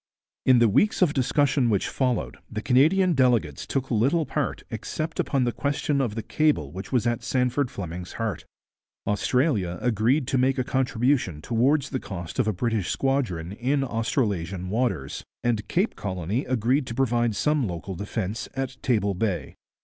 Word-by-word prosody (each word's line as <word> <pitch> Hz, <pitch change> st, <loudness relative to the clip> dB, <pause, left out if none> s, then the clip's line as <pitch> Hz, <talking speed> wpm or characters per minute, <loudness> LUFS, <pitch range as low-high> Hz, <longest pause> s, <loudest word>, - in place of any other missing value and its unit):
In 130 Hz, -1 st, +7 dB
the 120 Hz, -1 st, +5 dB
weeks 195 Hz, -, +3 dB
of 155 Hz, -5 st, +2 dB
discussion 135 Hz, -1 st, +2 dB
which 100 Hz, -4 st, +1 dB
followed 120 Hz, -, -1 dB
the 105 Hz, -, -5 dB
Canadian 170 Hz, +8 st, +4 dB
delegates 120 Hz, -, +1 dB
took 135 Hz, -1 st, -2 dB
little 135 Hz, +9 st, +2 dB
part -, -, -2 dB
except 160 Hz, +1 st, -4 dB
upon 135 Hz, -3 st, +1 dB
the 120 Hz, -, +1 dB
question 140 Hz, +2 st, 0 dB
of 115 Hz, -5 st, -1 dB
the 115 Hz, -, -3 dB
cable 150 Hz, -, +1 dB
which 95 Hz, +5 st, -7 dB
was 125 Hz, -3 st, +2 dB
at 120 Hz, -1 st, 0 dB
Sandford 125 Hz, +1 st, 0 dB
Fleming's 90 Hz, -3 st, -6 dB
heart. 110 Hz, -7 st, -3 dB, 0.6 s
Australia 105 Hz, -, +1 dB
agreed 125 Hz, +5 st, +2 dB
to 135 Hz, -, +2 dB
make 130 Hz, +2 st, +2 dB
a 130 Hz, -, +1 dB
contribution 125 Hz, -, +1 dB
towards 125 Hz, -, +1 dB
the 130 Hz, -, -1 dB
cost 90 Hz, 0 st, -6 dB
of 125 Hz, -, +2 dB
a -, -, +3 dB
British 110 Hz, -1 st, -1 dB
squadron 120 Hz, -12 st, -1 dB
in 130 Hz, +6 st, 0 dB
Australasian 100 Hz, -, -1 dB
waters, 100 Hz, -, -1 dB, 0.2 s
and 110 Hz, -3 st, 0 dB
Cape 190 Hz, +6 st, 0 dB
Colony 95 Hz, -, -2 dB
agreed 130 Hz, +3 st, +1 dB
to 115 Hz, -, -5 dB
provide 120 Hz, -3 st, +1 dB
some 150 Hz, 0 st, +1 dB
local 90 Hz, +2 st, -5 dB
defence 100 Hz, +2 st, -4 dB
at 135 Hz, -1 st, -4 dB
Table 105 Hz, -5 st, +1 dB
Bay. 95 Hz, -1 st, -2 dB
120 Hz, 165 wpm, -25 LUFS, 100-135 Hz, 0.6 s, In